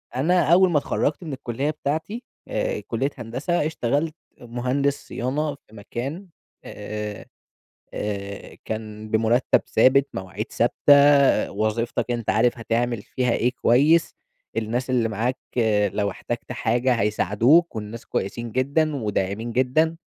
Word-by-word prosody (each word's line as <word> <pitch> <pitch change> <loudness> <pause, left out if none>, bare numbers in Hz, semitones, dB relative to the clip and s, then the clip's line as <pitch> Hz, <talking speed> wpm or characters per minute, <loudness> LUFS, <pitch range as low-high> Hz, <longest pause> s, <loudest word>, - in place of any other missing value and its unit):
أنا 165 +3 +3
أول 185 +1 +6
ما 155 - +3
اتخرجت 145 +3 -1
من 155 -4 -5
الكلية 130 +2 -3
بتاعتي، 160 - -3 0.2
آآ، - - -2
كلية 125 +4 -2
هندسة، 130 +8 -2
اشتغلت 155 +1 -1 0.3
مهندس 125 +4 -1
صيانة 145 +4 -2
في 110 - -21
مكان، 135 - -6 0.4
آآ، 105 -1 -6 0.7
آآ، 100 -1 -5
كان 110 -1 -6
بمرتب 115 +3 +3
ثابت، 135 +2 +4
مواعيد 95 +3 -5
ثابتة، 140 +3 +4
وظيفتك 110 +4 -1
أنت 115 -4 -1
عارف 115 +5 +2
هتعمل 115 -1 -1
فيها 125 +2 -1
إيه 120 +1 +1
كويس، 150 +8 +4 0.4
الناس 120 +4 -2
اللي 120 -3 +2
معاك 115 +4 -1 0.5
لو 100 -1 0
احتجت 120 +5 -5
حاجة 120 +3 +1
هيساعدوك، 115 - +3
والناس 110 +2 -7
كويسين 115 +4 -3
جدًا، 140 +5 +1
وداعمين 105 0 -2
جدًا، 145 +7 +2
120 Hz, 120 wpm, -23 LUFS, 110-145 Hz, 0.7 s, أول